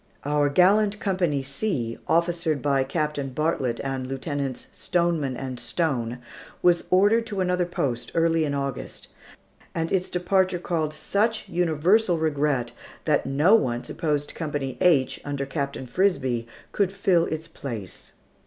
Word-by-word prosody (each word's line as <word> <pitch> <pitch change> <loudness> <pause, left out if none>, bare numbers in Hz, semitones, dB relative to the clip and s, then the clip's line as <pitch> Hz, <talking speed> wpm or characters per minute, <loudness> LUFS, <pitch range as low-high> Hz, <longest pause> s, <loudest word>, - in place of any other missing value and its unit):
Our 145 0 +2
gallant 200 +6 +4
Company 175 -8 0
C, 135 - -2
officered 170 -2 +1
by 140 0 +2
Captain 150 -1 -2
Bartlett 130 -4 -1
and 135 -1 -3
Lieutenants 135 0 -3
Stoneman 165 -7 0
and 130 -2 -5
Stone, 120 -2 -1 0.5
was 175 -1 +4
ordered 205 +5 +4
to 205 -3 -4
another 180 -1 +1
post 125 -8 -2
early 165 -1 +3
in 145 -2 -1
August; 140 -1 -5 0.7
and 165 -1 -1
its 185 -1 +1
departure 185 +1 +1
caused 160 -3 -2
such 220 +7 0
universal 175 +3 +2
regret 145 -6 0 0.3
that 150 -4 +2
no 150 +9 +4
one 120 - +2
supposed 150 -3 -2
Company 145 -5 -3
H, 145 -8 +3
under 140 -1 -3
Captain 140 -1 -3
Frisbie, 130 -6 0 0.2
could 200 -3 +1
fill 190 -4 +2
its 160 0 -4
place. 115 - -7
155 Hz, 135 wpm, -25 LUFS, 135-180 Hz, 0.7 s, gallant